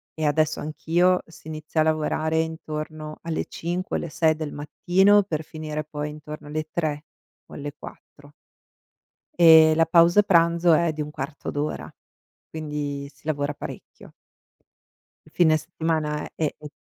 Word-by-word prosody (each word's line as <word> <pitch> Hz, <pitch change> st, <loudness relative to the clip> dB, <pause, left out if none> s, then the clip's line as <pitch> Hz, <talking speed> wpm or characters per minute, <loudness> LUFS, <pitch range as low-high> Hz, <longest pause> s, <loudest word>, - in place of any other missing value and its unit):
e 155 Hz, -, -2 dB
adesso 155 Hz, +1 st, +1 dB
anch'io, 175 Hz, +4 st, +1 dB
si 165 Hz, -1 st, -16 dB
inizia 155 Hz, 0 st, -2 dB
a -, -, +3 dB
lavorare 160 Hz, 0 st, 0 dB
intorno 155 Hz, -1 st, -5 dB
alle 165 Hz, -1 st, -2 dB
5 175 Hz, +3 st, -4 dB
o -, -, -3 dB
alle 170 Hz, -, -5 dB
6 160 Hz, 0 st, +2 dB
del 155 Hz, -2 st, -5 dB
mattino 190 Hz, +7 st, +3 dB
per 160 Hz, -5 st, -3 dB
finire 155 Hz, -1 st, -5 dB
poi 150 Hz, 0 st, -5 dB
intorno 150 Hz, 0 st, -9 dB
alle 155 Hz, +1 st, -4 dB
3 155 Hz, -3 st, -2 dB, 0.4 s
o -, -, -14 dB
alle 145 Hz, 0 st, -6 dB
4. 145 Hz, 0 st, -14 dB, 1.1 s
Ehm, 160 Hz, -2 st, +8 dB
la 165 Hz, +1 st, +4 dB
pausa 170 Hz, +4 st, +5 dB
pranzo 170 Hz, -3 st, +4 dB
è 165 Hz, 0 st, +2 dB
di 155 Hz, -, -4 dB
un 150 Hz, -, -4 dB
quarto 145 Hz, 0 st, -6 dB
d'ora, 145 Hz, +1 st, -3 dB, 0.6 s
quindi 145 Hz, -2 st, -4 dB
si -, -, -27 dB
lavora 145 Hz, -2 st, -1 dB
parecchio. -, -, -10 dB, 1.1 s
Il -, -, -19 dB
fine 160 Hz, -3 st, +4 dB
settimana 155 Hz, -2 st, -2 dB
è 155 Hz, -2 st, -1 dB
u 150 Hz, -, -9 dB
155 Hz, 150 wpm, -24 LUFS, 150-165 Hz, 1.1 s, Ehm